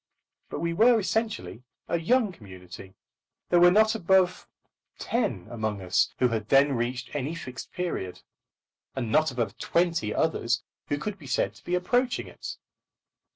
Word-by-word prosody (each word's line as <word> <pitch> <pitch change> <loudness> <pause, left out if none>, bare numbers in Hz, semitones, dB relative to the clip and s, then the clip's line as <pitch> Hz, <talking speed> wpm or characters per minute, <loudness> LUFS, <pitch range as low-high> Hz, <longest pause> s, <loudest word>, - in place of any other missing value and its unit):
But - - -5
we 170 0 0
were 230 +5 +5
essentially 220 - -2 0.3
a 170 - 0
young 225 +5 +2
community. 95 - -12 0.5
There 175 - +5
were 175 0 +8
not 220 +4 +4
above 190 -3 +2 0.5
ten 130 - -1
among 110 -3 -3
us 90 -1 +1
who 125 - +3
had 110 -2 -3
then 140 +1 +5
reached 125 +1 -3
any 145 +3 -2
Fixed 130 -6 -8
Period; 165 - -4 0.7
and 120 -4 -2
not 155 +3 +3
above 115 -5 -3
twenty 170 -10 +1
others 120 -6 0 0.2
who 145 - 0
could 200 +6 -5
be 145 - -11
said - - 0
to - - -19
be 180 - -1
approaching 245 +8 +1
it. - - -8
155 Hz, 155 wpm, -27 LUFS, 115-185 Hz, 0.7 s, were